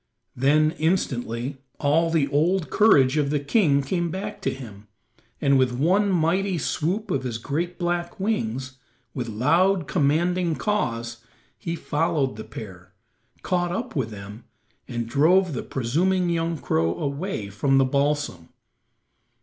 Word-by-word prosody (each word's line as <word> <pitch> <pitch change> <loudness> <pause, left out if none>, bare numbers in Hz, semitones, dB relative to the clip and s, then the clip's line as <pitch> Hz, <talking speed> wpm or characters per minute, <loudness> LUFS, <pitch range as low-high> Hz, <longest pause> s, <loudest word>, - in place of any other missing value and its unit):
Then 150 +4 +3
instantly 135 -6 -1 0.2
all 160 +3 +2
the 160 -4 +2
old 165 +5 +1
courage 145 -11 +5
of 145 -2 +1
the 150 0 +1
king 145 -2 +2
came 170 +4 -1
back 190 +4 -5
to - - 0
him, 110 -6 -10 0.5
and 140 -1 +3
with 130 -1 +3
one 185 +10 +2
mighty 180 +2 +1
swoop 185 +7 -2
of 135 - 0
his 125 -3 -3
great 165 +9 -3
black 175 +2 -2
wings, 130 - -2 0.3
with 125 -4 -4
loud, 165 - +2
commanding 170 +3 +1
caws, 120 - -2 0.3
he 165 -1 -4
followed 150 -5 0
the 110 - -7
pair, 95 -5 -10 0.5
caught 175 -2 0
up 230 +8 -4
with 130 -6 -1
them, 105 +2 -10 0.4
and 120 -2 -3
drove 165 +7 +3
the 125 - -3
presuming 175 +9 0
young 165 0 -1
crow 80 - 0
away 140 - -3
from 135 +6 +2
the 135 - +5
balsam. 140 - -1
145 Hz, 140 wpm, -24 LUFS, 125-175 Hz, 0.5 s, courage